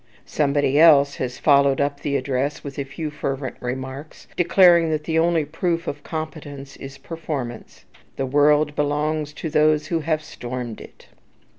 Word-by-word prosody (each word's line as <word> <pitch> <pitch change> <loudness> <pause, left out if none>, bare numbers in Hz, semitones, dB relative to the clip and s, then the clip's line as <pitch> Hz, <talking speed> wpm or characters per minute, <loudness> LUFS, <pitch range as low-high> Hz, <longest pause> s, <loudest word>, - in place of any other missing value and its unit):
Somebody 145 -1 +1
else 145 -3 +6
has 125 -1 -4
followed 140 -2 +3
up 140 0 -1
the 140 -1 -1
address 135 +2 -2
with 140 -1 -7
a - - -1
few 150 +3 -6
fervent 135 -3 -4
remarks, 130 +4 -6
declaring 175 -1 +5
that 155 -1 -1
the 160 +1 0
only 165 -2 +2
proof 165 +2 -2
of 145 -3 -5
competence 145 -4 -7
is 135 0 -9
performance. 135 -6 -7 0.3
"The 135 - -2
world 145 +2 +3
belongs 150 +1 -1
to 160 +1 -6
those 155 0 +3
who 165 - -1
have 155 0 -1
stormed 125 -5 -6
it." - - -14
145 Hz, 155 wpm, -22 LUFS, 135-155 Hz, 0.3 s, else